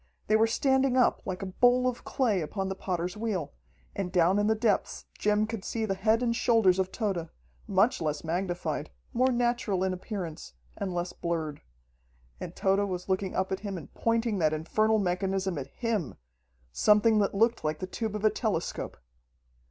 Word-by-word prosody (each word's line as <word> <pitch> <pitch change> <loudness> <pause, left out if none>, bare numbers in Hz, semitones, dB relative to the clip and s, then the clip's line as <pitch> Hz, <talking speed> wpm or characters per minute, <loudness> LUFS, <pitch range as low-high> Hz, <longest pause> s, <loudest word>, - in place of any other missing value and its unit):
They 215 - +3
were 220 +1 +5
standing 265 +2 +2
up 250 - +3
like 185 0 -3
a 185 -1 -6
bowl 250 +1 +5
of 250 -1 -3
clay 220 -9 +1
upon 190 +5 -3
the 190 - -3
potter's 180 -1 -3
wheel, 205 -9 -3 0.4
and 190 -3 -3
down 180 +2 +3
in 205 - +2
the 220 - +3
depths 215 -2 0
Jim 210 0 +2
could 220 -3 -5
see 225 -1 -2
the 195 - 0
head 220 +5 +2
and 235 -1 +1
shoulders 220 -7 +3
of 190 0 0
Tode, 190 -7 -2 0.4
much 195 +2 +2
less 150 -2 -2
magnified, 170 -3 -2 0.2
more 255 +2 +3
natural 240 -6 0
in 190 -1 0
appearance, 180 - -6 0.2
and 195 - -3
less 175 +1 -2
blurred. 160 -4 -3 0.8
And - - -7
Tode 195 +1 +1
was 180 0 -5
looking 190 0 -1
up 190 0 0
at 190 - -1
him 200 -2 -5
and 160 - -10
pointing 230 -2 0
that 155 -2 +2
infernal 215 +8 +1
mechanism 190 -2 -1
at 135 - -6
him 220 - -2 0.6
something 210 - +4
that 200 -1 +1
looked 225 +3 +2
like 155 0 -1
the 185 - -4
tube 215 +3 -4
of 210 0 -2
a 215 - +5
telescope. 210 -8 -2
195 Hz, 185 wpm, -29 LUFS, 180-225 Hz, 0.8 s, were